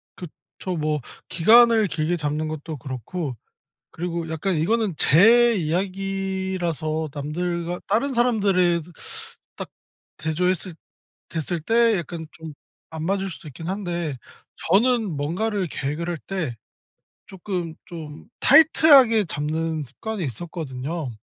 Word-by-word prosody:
그쵸. 180 +1 -8
뭐 150 -1 -1 0.3
기간을 225 +4 +6
길게 165 +1 -1
잡는 150 +1 -2
것도 155 0 -6
그렇고 130 - -5 0.6
그리고 170 -1 -4
약간 160 +4 -1
이거는 210 +5 +1
제 230 +8 +6
이야기라서 185 -3 -2
남들과 170 +4 -3
다른 245 +7 +1
사람들에도 190 -8 +2 0.6
딱 - - -7 0.5
대조했을 180 +3 -1 0.5
됐을 165 +1 -3
때 230 +3 +3
약간 165 0 -6
좀 160 -2 -9 0.4
안 160 0 -4
맞을 195 0 -1
수도 165 - -10
있긴 160 +4 -8
한데 175 -7 -3 0.5
저는 225 0 +3
뭔가를 185 +7 -1
계획을 150 +5 -3
할 170 - -3
때 165 -12 -3 0.7
쪼끔 180 -3 -5
좀 155 -3 -9
타이트하게 280 -8 +6
잡는 160 0 -2
습관이 195 - -6
있었거든요. 150 - -5
175 Hz, 245 characters per minute, -23 LUFS, 155-195 Hz, 0.7 s, 기간을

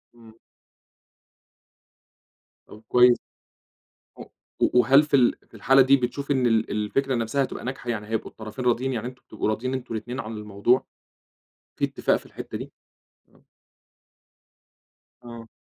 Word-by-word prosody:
امم. 115 -2 -16 2.3
طب 105 - -13
كويس، 125 0 +6 1.0
و - - -8 0.4
و 125 - +4
وهل 135 +4 +6
في 150 - -12
ال 125 -3 +4
في - - -37
الحالة 135 +5 +4
دي 135 +1 +5
بتشوف 140 +3 -3
إن 130 -3 +2
ال 115 -1 +1
ال 105 0 -1
الفكرة 135 +4 0
نفسها 115 +4 0
هتبقى - - -6
ناجحة، 125 -1 -5
يعني 105 -3 -3
هيبقوا 110 0 -3
الطرفين 110 +3 -8
راضيين؟ 125 +2 +1
يعني 120 0 -3
أنتُم 125 0 -11
بتبقوا 110 - -3
راضيين 125 +4 -2
أنتُم 130 -3 -5
الاتنين 120 +3 -5
عن 115 -2 -5
الموضوع؟ 105 +4 +1 0.9
في - - +1
اتفاق - - 0
في - - -6
الحتة - - -7
دي؟ - - -8 0.6
آه. - - -27 1.8
آه. 115 -1 -10
120 Hz, 145 wpm, -25 LUFS, 110-130 Hz, 2.3 s, كويس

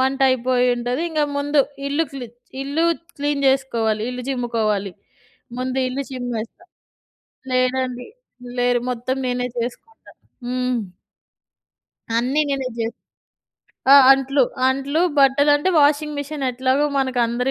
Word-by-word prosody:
వంట 265 +1 0
అయిపోయింటది. 250 0 +1
ఇంగ 310 -2 -1 0.2
ముందు 290 0 +2 0.3
ఇల్లు 295 +4 +1
క్లీ 260 -3 -6 0.4
ఇల్లు 285 +4 -1 0.3
క్లీన్ 290 0 -1
జేసుకోవాలి. 230 -5 +1
ఇల్లు 250 0 -6
చిమ్ముకోవాలి. 220 -6 -1 0.7
ముందు 255 +1 -2
ఇల్లు 265 +2 -3
చిమ్మేస్తా. 245 +3 -5 0.9
లేదండి. 255 0 0 0.5
లేరు. 245 -1 +2
మొత్తం 250 +2 -3
నేనే 250 0 -1
చేసుకుంటా. 250 - -7 0.4
హ్మ్. 250 0 -1 1.4
అన్నీ 260 +6 +1
నేనే 270 -2 -1
జే 225 - 0 1.0
ఆ! - - +10 0.2
అంట్లు, 270 0 +2 0.3
అంట్లు. 275 +4 0 0.2
బట్టలు 280 +2 +5
అంటే 295 +6 -1
వాషింగ్ 295 +1 +2
మిషన్ 285 0 -5
ఎట్లాగో 260 +3 +1
మనకు 260 -2 0
అందరి 245 +3 -1
260 Hz, 115 wpm, -21 LUFS, 245-280 Hz, 1.4 s, ఆ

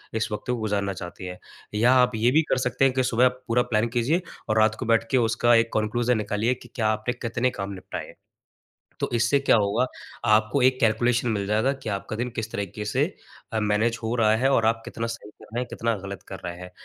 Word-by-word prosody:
इस 110 -1 0
वक़्त 105 -1 -4
को 125 - +1
गुज़ारना 100 -3 -1
चाहती 90 +1 -8
हैं। 90 0 -6 0.4
या 120 +4 +4
आप 125 -1 +4
ये 110 +2 +3
भी 155 +4 +5
कर - - +2
सकते 125 +1 +1
हैं 130 - +3
कि 130 0 +1
सुबह 125 0 +3
आप 125 0 0
पूरा 120 +1 +3
प्लान 110 +2 +2
कीजिए 135 +9 +1 0.3
और 110 - +2
रात 110 0 +4
को 125 - -3
बैठ 115 0 +3
के 130 - +4
उसका 120 0 +3
एक 115 0 +3
कन्क्लूजन 120 +3 +1
निकालिए 105 +3 0
कि 120 - -15
क्या 110 -3 +1
आपने 110 +2 0
कितने 120 +1 -1
काम 100 -2 -5
निपटाए 95 - -6
हैं। - - -14 0.9
तो - - -1
इससे 120 +4 +3
क्या 135 - +4
होगा, 105 +4 +2 0.4
आपको 110 +4 +3
एक 130 0 +3
कैलकुलेशन 120 +1 +2
मिल 100 -3 -1
जाएगा 110 +6 +2
कि 135 -4 -8
आपका 100 +2 -4
दिन 120 +2 -2
किस 110 0 -3
तरीके 100 +1 -4
से 105 - +1 0.6
मैनेज 110 +2 +1
हो 115 +1 -1
रहा 110 -2 +4
है 130 +4 +2
और 115 -4 +3
आप 115 0 +1
कितना 115 - -4
सही 115 -2 -7
कर - - -18
रहे 120 - 0
हैं, 125 - -3
कितना 115 0 -1
ग़लत 100 -2 -7
कर 95 - -7
रहे 85 0 -4
हैं। 90 0 -9
115 Hz, 235 wpm, -25 LUFS, 105-125 Hz, 0.9 s, भी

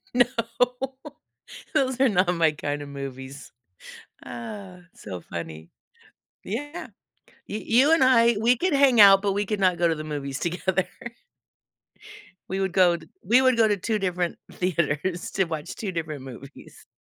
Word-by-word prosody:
No. 245 -1 +5 1.5
Those 260 -4 +1
are 270 - +5
not 185 -4 +2
my 165 -2 +3
kind 145 -1 -4
of 145 - -8
movies. 135 0 -8 0.7
Uh, 185 - -8 0.2
so 90 -2 -8
funny. 80 -1 -8 0.7
Yeah. 290 - -5 0.6
You 210 - -4
you 260 +9 +4
and 325 - +4
I, 235 -3 +5
we 235 +3 +4
could 360 +6 0
hang 270 -5 +5
out, 195 -1 +8
but 200 -1 0
we 205 +1 -1
could 210 0 -2
not 185 -2 +2
go 170 0 +3
to 165 - +1
the 155 - -6
movies 140 -3 -5
together. 180 +2 -1 1.6
We 190 +1 -2
would 190 -2 -1
go 180 -2 +4
t - - -15 0.2
we 245 +3 +5
would 255 -2 +4
go 225 -1 +4
to 205 - +1
2 215 +3 -1
different 180 -3 -2
theaters 170 0 -2
to 195 - +1
watch 160 -3 -5
2 200 -4 -5
different 155 -4 -4
movies. 135 +2 -12
185 Hz, 160 wpm, -25 LUFS, 150-225 Hz, 1.6 s, out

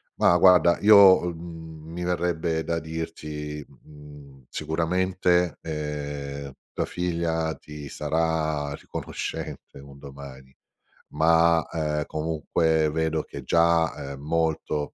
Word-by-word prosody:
Ma 85 - +4
guarda, 90 -1 +6
io, 100 -3 +8
uhm, 80 -2 -8
mi 90 +1 -5
verrebbe 85 -2 -1
da 85 0 -1
dirti, 75 -2 -6
mhmm, 70 -1 -15
sicuramente, 90 +1 0
ehm, 75 -2 -5 0.2
tua - - -1
figlia 85 -2 -1
ti 75 -1 -10
sarà 80 -1 -1
riconoscente - - -6
un 70 0 -13
domani. 70 -2 -11 0.6
Ma, 80 +1 +4
ehm, 75 -2 -1
comunque 80 0 0
vedo 80 0 0
che 70 - -9
già, 80 -2 +2
ehm, 70 - -10
molto, 80 -1 -1
80 Hz, 105 wpm, -25 LUFS, 75-85 Hz, 0.6 s, io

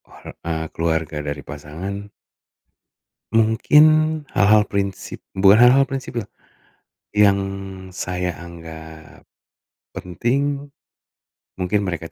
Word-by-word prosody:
Oh, - - -16 0.2
eee, 80 -1 -2
keluarga 80 -1 -1
dari 70 0 -4
pasangan 90 +8 -7 1.2
mungkin 115 +7 +5 0.5
hal-hal 105 +1 +5
prinsip 100 -1 -4
bukan 95 +2 +5
hal-hal 135 +3 +6
prinsip, 135 -3 -4 1.0
yang 100 -1 +5 0.6
saya 90 -1 -3
anggap, 80 -2 -11 0.7
penting, 140 - -2 0.9
mungkin 95 +2 0
mereka 85 -2 -5
95 Hz, 85 wpm, -21 LUFS, 80-110 Hz, 1.2 s, hal-hal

